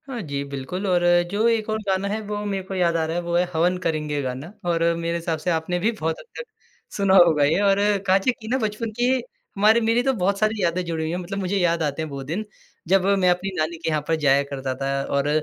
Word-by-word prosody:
हाँ 250 -4 -5
जी, 140 -5 -4
बिल्कुल 140 +8 -5
और 180 -2 +2 0.3
जो 215 +3 +2
एक 225 -2 +1
और 215 - 0
गाना 190 0 0
है 210 +2 -2
वो 210 0 -3
मेरे 195 -2 -2
को 190 - -8
याद 175 -2 +2
आ 160 - 0
रहा 160 +1 -3
है - - 0
वो 170 0 -2
है 175 - +4
हवन 175 +3 +2
करेंगे 150 -4 -2
गाना 130 +5 -5 0.2
और 165 -1 +1
मेरे 170 0 -2
हिसाब 165 -1 -3
से 165 - -2
आपने 165 +2 -1
भी 215 +6 +1
बहुत 160 -7 -3
हद - - -13
तक - - -4 0.5
सुना 195 -1 +3
होगा 165 -5 +6
ये 150 +6 +3
और 200 -1 +3 0.3
काँची 195 +6 +3
की 225 -3 -12
ना 255 +3 +1
बचपन 215 0 -3
की 245 +1 +3 0.4
हमारी 215 +3 +4
मेरी 230 +2 +2
तो 270 0 +2
बहुत 200 -2 0
सारी 215 -2 0
यादें 175 +1 0
जुड़ी 165 -1 -3
हुई 160 - -2
हैं। 175 - -2
मतलब 185 +2 -5
मुझे 195 +1 -1
याद 170 -3 +1
आते 150 +1 -2
हैं 160 - -4
वो 140 -1 -6
दिन, 170 +10 -4 0.4
जब 190 +1 +3
मैं 180 -1 +3
अपनी 180 +2 0
नानी 155 +2 -1
के 165 0 -3
यहाँ 155 -1 0
पर 165 - +2
जाया 140 -2 +3
करता 135 -2 -4
था 135 0 -2
और 140 +1 +1
175 Hz, 255 wpm, -23 LUFS, 160-200 Hz, 0.5 s, होगा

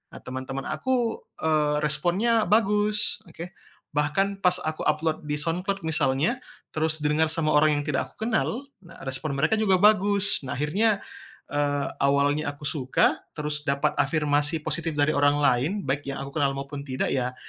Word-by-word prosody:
a - - -8
teman-teman 130 +1 -5
aku, 245 -3 -1 0.2
eee, 150 -2 +2
responnya 180 +10 +2
bagus, 210 -1 +3
oke. 170 +2 -9 0.4
Bahkan 195 +7 0
pas 180 0 +4
aku 155 0 -3
upload 155 +1 0
di 150 - -2
SoundCloud 180 +6 -2
misalnya, 155 - +1 0.4
terus 155 0 0
didengar 150 +2 +2
sama 160 -2 0
orang 150 +1 +5
yang - - -6
tidak 145 - -2
aku - - -26
kenal, 240 +3 -1 0.2
nah 170 -2 -15
respon 135 +3 -2
mereka 155 +9 +2
juga 195 -4 +3
bagus. 205 -1 +4
Nah 130 - -4
akhirnya, 200 +9 +1 0.5
eee, 145 -1 0
awalnya 145 +2 +2
aku 145 - -16
suka, 135 -4 +1 0.2
terus 150 0 -2
dapat 140 0 +1
afirmasi 150 0 +1
positif 160 +1 -2
dari 145 +1 +3
orang 145 0 +3
lain 130 +6 +2
baik 140 +2 -2
yang 135 - -4
aku 140 +2 -6
kenal 140 -2 +1
maupun 140 +1 -6
tidak 130 0 -2
ya, 125 -1 -1
155 Hz, 160 wpm, -25 LUFS, 145-190 Hz, 0.5 s, orang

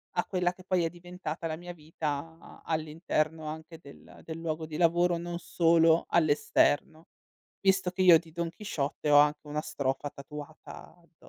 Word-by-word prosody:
a - - +1
quella 180 -2 0
che 185 - -16
poi 185 -2 +1
è 165 - 0
diventata 175 -1 -7
la 155 - -3
mia 175 0 -8
vita 155 0 -6
all'interno 155 0 -1
anche 160 +1 -7
del 140 -3 -15
del 160 0 -7
luogo 160 -1 -3
di 155 -1 -6
lavoro, 175 0 +3
non 170 0 -5
solo 165 -1 +3
all'esterno, 155 0 +2 0.5
visto 190 -2 +2
che 185 +1 -3
io 175 -3 +9
di 165 -2 -16
Don 170 0 -3
Chisciotte 155 -6 -3
ho 145 - +8
anche 150 +1 +2
una 150 +1 -2
strofa 140 0 -2
tatuata 150 +5 -11
addo 170 -1 -28
165 Hz, 165 wpm, -29 LUFS, 155-175 Hz, 0.5 s, io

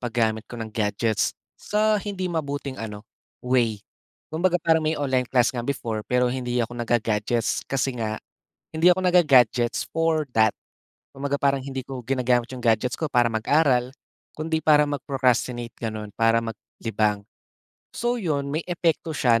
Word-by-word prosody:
pag-gamit 110 -2 -1
ko 120 - -8
ng 110 -1 -6
gadgets, 110 0 0 0.2
sa 215 0 +1
hindi 200 -2 -4
mabuting 140 -4 -3
ano, 105 -1 -7 0.4
way. 115 -5 +1 0.5
Kumbaga 175 +2 +2
parang 160 -2 +2
may 155 0 0
online 130 -3 0
class 125 -2 +3
nga 125 - -3
before, 115 -3 -3
pero 125 0 +2
hindi 125 -2 -1
ako 115 - -10
nagga-gadgets, 115 -1 0
kasi 135 0 0
nga, 110 -1 -2 0.6
hindi 160 +2 +4
ako 185 - -1
nag 180 0 +4
ga-gadgets 125 -3 +3
for 160 -1 +1
that. 110 -1 +5 0.6
Kumbaga 140 +1 -2
parang 140 -1 +2
hindi 135 -1 -4
ko 135 -2 -6
ginagamit 125 -1 +1
iyong 125 -1 -7
gadgets 115 +2 +2
ko - - -3
para 120 -2 +4
mag-aral, 125 +1 +2 0.4
kundi 160 +1 -1
para 150 -1 +6
mag-procrastinate 125 -4 -1
ganoon, 110 -2 -5
para 115 0 +3
mag 115 -2 -5 0.2
libang. 105 -2 0 0.7
So 240 +1 0
iyon, 145 -7 -1
may 155 - 0
epekto 165 -2 0
siya 115 -4 +3
125 Hz, 155 wpm, -24 LUFS, 115-150 Hz, 0.7 s, para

